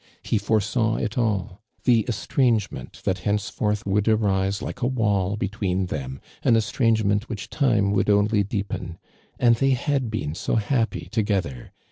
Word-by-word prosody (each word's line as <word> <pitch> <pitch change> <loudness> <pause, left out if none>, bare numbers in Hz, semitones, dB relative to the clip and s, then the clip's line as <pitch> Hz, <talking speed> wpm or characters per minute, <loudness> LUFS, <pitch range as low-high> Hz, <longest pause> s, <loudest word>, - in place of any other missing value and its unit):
lie 110 - +3
foresaw 110 +2 +1
it 105 - -2
all 105 -6 -1
— - - -42
the 120 -3 +5
estrangement 115 -1 -1
that 95 - 0
hencefortii 105 +2 -1
would 100 +1 +1
arise 100 -2 +2
like 125 - -6
a 120 - +2
wall 105 -6 +1
between 100 -2 -1
them, 65 -6 -5 0.2
an 115 - +4
estrangement 110 -2 +1
which 105 -5 -6
time 115 -8 +2
would 100 0 +1
only 105 +1 +3
deepen. 100 -4 -4 0.4
And 120 -1 +4
they 135 +1 +3
had 135 -1 -1
been 75 -9 -3
so - - -2
happy 110 -6 0
together 95 - -1
105 Hz, 150 wpm, -24 LUFS, 100-115 Hz, 0.4 s, the